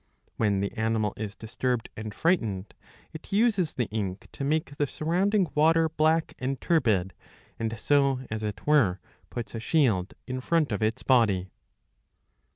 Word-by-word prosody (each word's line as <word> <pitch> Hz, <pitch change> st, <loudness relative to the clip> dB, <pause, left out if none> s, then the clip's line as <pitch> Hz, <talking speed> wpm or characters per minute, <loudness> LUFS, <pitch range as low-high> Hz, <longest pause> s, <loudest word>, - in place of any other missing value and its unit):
'^ -, -, -41 dB, 0.3 s
When 100 Hz, -3 st, +2 dB
the 100 Hz, -, -1 dB
animal 110 Hz, -2 st, 0 dB
is 105 Hz, -1 st, -5 dB
disturbed 120 Hz, +1 st, -2 dB
and 110 Hz, 0 st, -6 dB
frightened 110 Hz, -, 0 dB, 0.4 s
it 160 Hz, -, -10 dB
uses 200 Hz, -5 st, +2 dB
the 125 Hz, -3 st, 0 dB
ink 100 Hz, -3 st, -4 dB
to -, -, -6 dB
make 145 Hz, 0 st, -1 dB
the 145 Hz, -, +1 dB
surrounding 180 Hz, +4 st, +1 dB
water 160 Hz, +2 st, +4 dB
black 160 Hz, +1 st, +1 dB
and 130 Hz, +1 st, -2 dB
turbid, 110 Hz, -, +1 dB, 0.5 s
and 115 Hz, 0 st, -2 dB
so, 140 Hz, +1 st, +2 dB
as 110 Hz, 0 st, -3 dB
it 105 Hz, -1 st, -5 dB
were, 120 Hz, -12 st, +3 dB, 0.3 s
puts 120 Hz, -1 st, -6 dB
a 115 Hz, -, -4 dB
shield 110 Hz, -, +1 dB
in 130 Hz, 0 st, -4 dB
front 160 Hz, 0 st, +1 dB
of 105 Hz, -, -2 dB
its 110 Hz, +1 st, 0 dB
body. 100 Hz, -8 st, +3 dB
125 Hz, 160 wpm, -27 LUFS, 110-155 Hz, 0.5 s, water